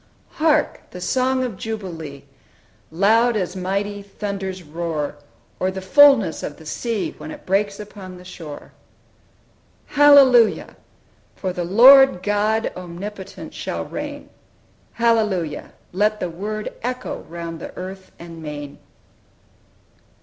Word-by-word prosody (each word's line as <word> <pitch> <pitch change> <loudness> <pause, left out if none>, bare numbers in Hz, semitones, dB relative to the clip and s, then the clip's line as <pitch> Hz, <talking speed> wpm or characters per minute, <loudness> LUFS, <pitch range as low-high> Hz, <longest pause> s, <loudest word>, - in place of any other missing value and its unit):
"Hark! 310 -1 +1
the 180 - -9
song 255 +7 +1
of 235 -7 -4
jubilee, 165 -11 -6 0.7
Loud 220 +7 +3
as 185 -2 -3
mighty 200 +2 -2
thunders' 195 -2 -5
roar, 155 -2 -4 0.4
Or 185 - +1
the 190 0 -5
fullness 225 - +5
of 145 - -6
the 160 - -14
sea 225 +6 -3
When - - -8
it - - -10
breaks 200 +2 0
upon 195 -3 -9
the 180 - -14
shore! 160 -5 -10 1.1
"Hallelujah! 275 -5 +5 0.6
for 185 -2 -3
the 180 - -3
Lord 250 +1 +7
God 210 +2 0
Omnipotent 185 +3 -8
shall - - -4
reign! - - -7 0.6
Hallelujah! 215 -9 0 0.2
let 210 +3 +1
the 175 - -3
word 210 +5 -5
Echo 250 +2 -4
round 170 -1 -6
the - - -7
earth 190 +1 -8
and 170 -1 -10
main." 145 -2 -7
195 Hz, 120 wpm, -21 LUFS, 175-225 Hz, 1.1 s, Lord